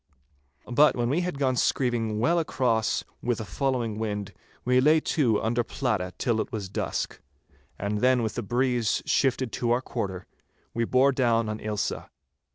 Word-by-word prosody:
But 145 +5 +4
when 120 -1 0
we 165 +5 +1
had 180 -4 -3
gone 135 -2 +1
screeving 120 -4 0
well 165 +10 +2
across 120 -8 0 0.2
with 120 -1 -1
a 110 - -4
following 115 +1 -1
wind, 105 -3 -3 0.3
we 125 +1 +4
lay 155 +4 +5
to 130 -9 +1
under 120 +2 +1
Pladda 105 -9 -2
till 115 -4 +1
it - - -6
was 105 -5 -4
dusk, 95 - -3 0.6
and 105 +1 -2
then 125 +1 +3
with 110 - -2
a - - -1
breeze 120 0 0
shifted 130 -3 +1
to 120 - -2
our 120 +2 +2
quarter 95 -8 -4 0.5
we 115 0 0
bore 130 +4 +4
down 115 -4 +2
on 110 0 -3
Ailsa. 105 -1 -3
120 Hz, 165 wpm, -26 LUFS, 110-130 Hz, 0.6 s, lay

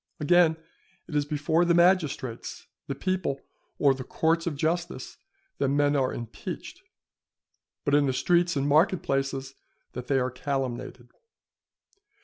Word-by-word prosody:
Again, 160 +1 +4 0.5
it 155 - -7
is 145 -1 +2
before 150 +3 +1
the 170 -1 +3
magistrates, 170 -9 +1 0.2
the 140 - -3
people, 185 -3 -1 0.4
or 140 -2 +4
the 130 -1 -6
courts 165 +5 0
of 160 - -1
justice 170 +4 -2 0.4
that - - +2
men 145 +1 +2
are 135 -2 +1
impeached; 120 -1 -7 1.0
but 145 - +1
in 145 -1 +4
the - - +2
streets 175 +4 +2
and 140 0 0
market 160 +5 +3
places 135 0 -2 0.4
that 125 0 -6
they 135 - +2
are 130 0 0
calumniated. 130 -2 -4
145 Hz, 135 wpm, -27 LUFS, 135-170 Hz, 1.0 s, Again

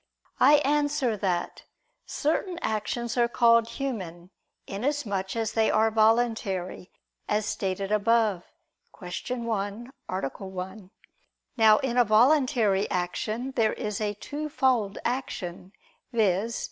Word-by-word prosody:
I 295 - +7
answer 290 -4 +1
that, 185 -3 -2 0.4
Certain 340 +4 -1
actions 225 +3 -2
are 240 -1 +4
called 230 -1 +4
human, 190 -9 -5 0.3
inasmuch 205 -4 -2
as 225 -2 -1
they 225 -1 +2
are 220 +1 +3
voluntary, 220 -5 +1 0.4
as 210 0 +1
stated 195 -1 -3
above 215 -3 +2 0.5
(Q. 180 +7 -5
1, 220 +2 -3 0.2
A. 185 - -2 0.2
1). 190 0 -7 0.7
Now, 220 -3 +6
in 260 -3 -2
a - - +7
voluntary 225 -3 +3
action, 215 +8 -2
there 225 -4 +1
is 210 0 -4
a 210 -1 -1
twofold 260 -5 -1
action, 190 -8 -4 0.4
viz. 220 0 +1
220 Hz, 110 wpm, -27 LUFS, 195-245 Hz, 0.7 s, I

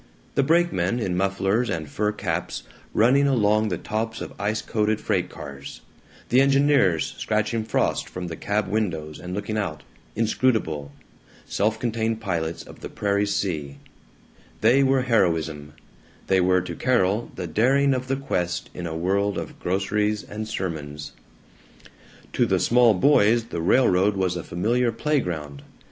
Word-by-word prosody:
The - - +3
brakemen, 135 - +2
in 95 -6 -1
mufflers 100 +5 +1
and 80 -5 -3
fur 105 +8 -1
caps, 105 - -3 0.3
running 135 +5 +4
along 110 -4 +3
the 90 -4 -2
tops 110 +4 -3
of - - -7
ice 105 +2 -1
coated 110 -1 0
freight - - -1
cars; 70 0 -9 0.5
the 125 +2 +5
engineers 135 - +3
scratching 110 +1 0
frost 110 - 0
from 90 0 -6
the 85 -1 -5
cab 100 +3 -1
windows 85 -8 -2
and 90 +1 -6
looking 105 +1 -2
out, 85 -8 -4 0.3
inscrutable, 110 - 0 0.5
self 110 +2 0
contained, 115 -1 -1
pilots 85 -6 -3
of - - -14
the - - -7
prairie 100 0 0
sea 80 -8 -2 0.8
they 120 +5 +5
were 135 -1 +3
heroism, 80 - 0 0.5
they 95 -1 +3
were 90 0 +3
to 90 - -6
Carol 115 -3 +1
the 90 - -4
daring 135 - +3
of 130 0 -3
the 135 - 0
quest 90 -11 -2
in 85 -1 -5
a 80 0 -4
world 100 +4 0
of 85 -2 -6
groceries 105 +3 0
and 110 +1 -6
sermons. 75 -8 -5 1.2
To - - +2
the - - +2
small 120 -2 +4
boys 115 +1 +4
the 85 - -3
railroad 100 0 +3
was 95 -2 0
a 90 - -3
familiar 120 +7 0
playground. 90 - -2
105 Hz, 150 wpm, -24 LUFS, 90-115 Hz, 1.2 s, the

